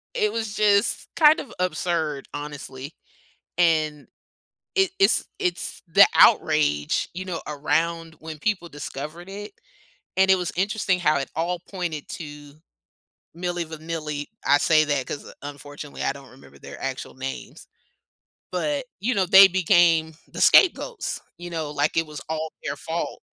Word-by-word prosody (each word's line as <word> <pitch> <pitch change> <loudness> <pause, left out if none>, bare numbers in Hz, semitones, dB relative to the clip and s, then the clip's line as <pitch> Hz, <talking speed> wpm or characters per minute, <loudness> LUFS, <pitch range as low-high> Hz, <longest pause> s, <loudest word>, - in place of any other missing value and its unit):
It 210 - +1
was 220 -2 -3
just 205 -1 +2
kind 305 -1 +6
of 255 - -8
absurd, 170 -5 -1
honestly, 145 -1 -7 0.6
and 155 -4 +2 0.7
it 385 -2 +3
it's 390 - +3
it's 180 0 -3
the 165 - +7
outrage, 75 -1 +4
you 185 +2 -5
know, 180 -3 -4
around 160 +3 -1
when 160 -1 -8
people 185 0 -1
discovered 150 +3 -7
it 205 +2 -8 0.7
and 190 0 +4
it - - +7
was 180 -2 -3
interesting 195 0 0
how 155 -4 +3
it 135 - -3
all 170 +2 -1
pointed 175 -6 -4
to 145 -2 -9 0.8
Milli 175 0 -2
Vanilli. 155 -2 -5 0.2
I 145 - +5
say 155 +1 +4
that 145 -3 -1
'cause 145 - -7
unfortunately, 145 0 -8
I - - +1
don't 140 -1 -13
remember 130 - -17
their - - -11
actual 135 -1 -5
names. 135 +1 -7 0.9
But, 275 +9 -1 0.2
you 245 +5 +1
know, 195 -5 +2
they 190 +2 +9
became 175 -3 +3 0.2
the - - -8
scapegoats, 420 +4 +4 0.2
you 175 0 -8
know, 160 -3 -4
like, 145 +2 0
it 165 - +2
was 150 -1 -9
all 160 0 -3
their 145 -1 -3
fault. 165 +3 -4
165 Hz, 145 wpm, -24 LUFS, 145-185 Hz, 0.9 s, they